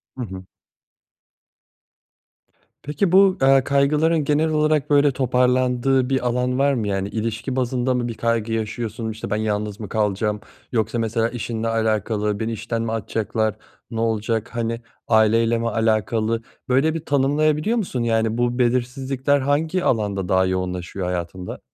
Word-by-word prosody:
Hı 130 - -6
hı. 95 -2 -9 2.4
Peki 150 +6 0
bu, 195 0 +5
eee, 135 -1 +5
kaygıların 150 +3 +2
genel 150 +2 +1
olarak, 155 -2 +1
böyle, 145 -1 +4
toparlandığı 125 0 +2
bir 130 -2 0
alan 125 +1 0
var 140 0 +3
mı? 110 -5 -1
Yani, 95 0 -1
ilişki 115 +4 -3
bazında 130 0 0
mı 120 -1 -1
bir 115 - -4
kaygı 115 0 -1
yaşıyorsun, 110 0 -3
işte, 110 - -7
ben 105 - 0
yalnız 105 0 -2
mı 105 - -7
kalacağım 105 0 0 0.3
yoksa 115 0 0
mesela, 115 0 0
işinle 115 -1 -4
alakalı 110 -2 0
beni 115 +1 -2
işten 115 +1 -3
mi 115 -1 -2
atacaklar, 110 0 -1 0.4
ne 115 - -3
olacak, 115 +1 -1
hani, 115 0 -2 0.3
aileyle 115 +1 +3
mi 115 0 -1
alakalı 110 +1 0 0.3
böyle 140 +5 +3
bir 165 -1 -5
tanımlayabiliyor 150 - +1
musun? 135 - -2
Yani, 115 0 +1
bu 120 +1 0
belirsizlikler 130 +3 +1
hangi 155 +6 0
alanda 100 -5 0
daha 95 0 +3
yoğunlaşıyor 90 0 -3
hayatında? 90 0 -4
115 Hz, 145 wpm, -22 LUFS, 110-135 Hz, 2.4 s, bu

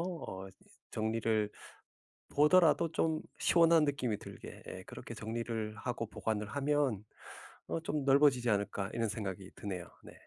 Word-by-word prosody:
어 165 - -5 0.4
정리를 110 -1 +1 0.8
보더라도 165 +1 +5
좀 160 -1 +1 0.2
시원한 165 -2 +5
느낌이 125 -7 0
들게 - - -10
예 - - -6
그렇게 - - -8
정리를 110 -1 -3
하고 115 0 -3
보관을 105 0 -2
하면 140 -5 +1 0.6
어 165 - -1
'좀 150 -3 -2
넓어지지 135 -3 +5
않을까?' 100 -1 0
이런 115 -1 0
생각이 100 -3 -4
드네요. 95 -4 -5 0.2
네. - - -11
115 Hz, 285 characters per minute, -33 LUFS, 105-150 Hz, 0.8 s, 보더라도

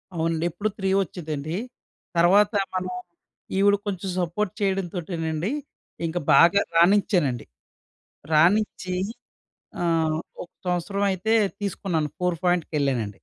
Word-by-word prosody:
అవునండి. 165 0 0
ఎప్పుడు 200 +6 -2
3 195 -1 -1
వోచ్చేదండి, 155 -3 -3 0.6
తరువాత 200 +5 +5 0.2
మనం 185 0 -2 0.7
ఈవిడ 200 +1 +5
కొంచెం 195 -1 -3
సపోర్ట్ 180 +3 -1
చేయడంతోటేనండి 175 -2 -2 0.5
ఇంక 165 +2 -2 0.2
బాగా 170 +8 +6 0.2
రానించానండి. 175 - +3 0.9
రానిచ్చి 185 +3 +3 0.9
ఆహ్, 165 -2 +1 0.3
ఒక 175 - -10 0.2
సంవత్సరమైతే 195 +3 0 0.3
తీసుకున్నాను, 175 -6 -2
4 180 -1 +1
ఫోయింట్‌కెళ్ళానండి. 145 - +1
175 Hz, 90 wpm, -25 LUFS, 160-195 Hz, 0.9 s, బాగా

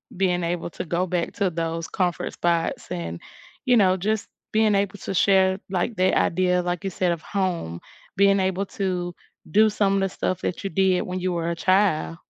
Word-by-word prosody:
being 180 -1 +1
able 170 0 -2
to - - -6
go 175 +2 0
back 175 -2 -2
to 200 -2 0
those 165 -1 -3
comfort 180 -2 -1
spots, 170 -1 -1
and, 85 -1 -4 0.5
you 250 - +4
know, 190 -3 +4
just 215 +3 -1 0.2
being 215 -1 +3
able 200 0 0
to - - -4
share, 190 0 +3
like, 190 +5 -1
the 185 +1 +3
idea 180 +1 +2
like 175 +1 -3
you - - 0
said 180 -1 0
of 170 -2 -3
home, 175 - -2 0.4
being 200 +1 +4
able 190 +1 0
to 180 -3 -3 0.4
do 215 +5 +5
some 200 -2 +1
of - - +2
the 195 - +1
stuff 185 0 -2
that 180 - -3
you 195 - -2
did 185 +1 +2
when 185 0 -4
you 185 0 -1
were 170 -1 -1
a - - -2
child. 185 -2 +2
185 Hz, 200 wpm, -24 LUFS, 175-195 Hz, 0.5 s, do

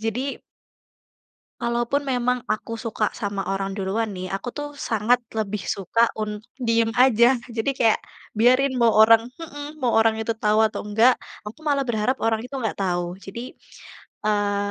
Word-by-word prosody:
Jadi 245 +5 -3 1.2
kalaupun 240 +4 0
memang 250 -2 0
aku 215 +2 -2
suka 220 -2 -1
sama 200 -3 -3
orang 195 0 -2
duluan 205 +3 -1
nih, 185 -1 -5
aku 195 +5 -3
tuh 290 +2 -5
sangat 235 -1 +1 0.2
lebih 210 -2 -2
suka 230 +6 +1
untuk 210 -1 -4 0.2
diam 230 -2 +2
aja. 250 0 +5
Jadi 230 +2 -1
kayak 225 -2 +3 0.4
biarin 255 +5 +4
mau 235 - +6
orang 225 +2 +6
mhm, 295 -2 -8
mau 245 -4 +1
orang 225 0 +4
itu 220 +1 -1
tahu 215 -1 +2
atau 215 - -3
enggak, 225 +5 +4 0.3
aku 210 +8 -9
malah 285 -3 +1
berharap 235 +3 0
orang 225 -1 +1
itu 255 +3 -8
enggak 225 -4 -2
tahu. 175 -2 -1
Jadi, 235 +6 -8 0.7
eee, 205 -1 0
225 Hz, 155 wpm, -23 LUFS, 210-250 Hz, 1.2 s, mau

